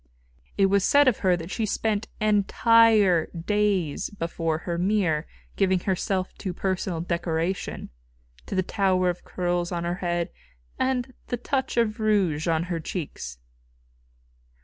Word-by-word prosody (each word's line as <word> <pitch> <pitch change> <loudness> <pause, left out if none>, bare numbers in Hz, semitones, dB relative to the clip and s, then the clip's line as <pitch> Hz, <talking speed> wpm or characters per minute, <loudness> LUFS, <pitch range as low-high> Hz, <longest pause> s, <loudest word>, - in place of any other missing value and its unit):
It 195 - +5
was 195 0 +3
said 285 +4 +5
of 250 - +3
her 180 -2 +3
that 165 +2 -7
she 225 - -2
spent 215 0 -1
entire 215 -3 +4
days 190 -3 0
before 165 -4 -2
her 170 -1 -2
mirror 180 -5 +1 0.3
giving 190 -2 +2
herself 185 0 -1
to 190 -3 -3
personal 185 -3 -2
decoration 170 - -2 0.6
to - - -4
the 185 - +2
tower 185 -2 +1
of 175 - -11
curls 175 -1 -2
on 170 -1 -2
her 175 +1 -2
head 175 -1 -1 0.5
and 255 -1 0
the 245 - -2
touch 260 +1 -2
of 220 -2 +1
rouge 195 -8 +1
on 165 -1 +2
her 175 -1 -3
cheeks. 145 - -6
185 Hz, 140 wpm, -25 LUFS, 170-210 Hz, 0.6 s, It